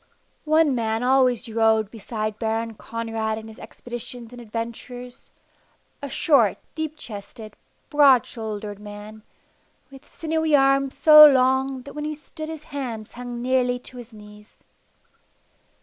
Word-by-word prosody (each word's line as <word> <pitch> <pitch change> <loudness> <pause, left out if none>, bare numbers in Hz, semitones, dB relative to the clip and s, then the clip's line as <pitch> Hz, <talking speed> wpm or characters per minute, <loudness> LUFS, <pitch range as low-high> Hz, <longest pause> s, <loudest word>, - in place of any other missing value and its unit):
One 310 -2 +4
man 225 -1 -1
always 255 -2 +2
rode 220 -2 +2
beside 215 -1 -5
Baron 225 0 -2
Conrad 225 0 -4
in 220 0 -9
his 220 - -13
expeditions 240 -1 -9
and 245 - -10
adventures 235 +2 -7 0.7
a 280 - -5
short, 285 +3 +3 0.2
deep 315 -1 -4
chested, 215 -2 -10 0.4
broad 280 -5 +6
shouldered 210 -3 -6
man, 210 +1 -10 0.7
with 270 -1 -15
sinewy 320 -1 0
arms 275 -1 +2
so 305 -1 +9
long 265 -1 +2
that 280 - -11
when 300 0 -5
he 305 0 -3
stood 310 +1 -9
his 320 -2 -7
hands 250 -8 -6
hung 245 0 -7
nearly 250 -1 +1
to 250 +1 -13
his 245 -1 -10
knees. 210 0 -16
245 Hz, 135 wpm, -23 LUFS, 220-275 Hz, 0.7 s, so